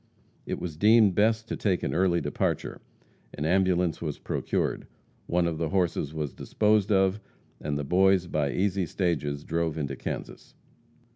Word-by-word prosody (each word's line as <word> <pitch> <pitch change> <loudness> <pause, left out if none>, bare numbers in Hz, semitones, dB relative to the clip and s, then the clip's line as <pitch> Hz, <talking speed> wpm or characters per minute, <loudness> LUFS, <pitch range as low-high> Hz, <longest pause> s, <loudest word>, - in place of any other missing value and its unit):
It - - -2
was 80 -4 -5
deemed 105 +1 +5
best 110 +3 +2
to - - -3
take 95 -4 0
an - - -1
early 85 0 +2
departure. - - -2 0.5
An 75 - -3
ambulance 90 -1 +2
was 75 -4 -3
procured. - - -2 0.4
One 90 0 +1
of 80 -2 -2
the 80 - -1
horses 90 -6 0
was 75 -4 -4
disposed 105 -1 +1
of, 95 +1 +3 0.4
and 75 -1 -3
the 75 - -2
boys 95 +4 +3
by 75 -4 -1
easy 95 0 0
stages 75 -5 -1
drove 80 -2 -1
into 70 -3 -3
Kansas. - - -7
90 Hz, 155 wpm, -27 LUFS, 80-95 Hz, 0.5 s, deemed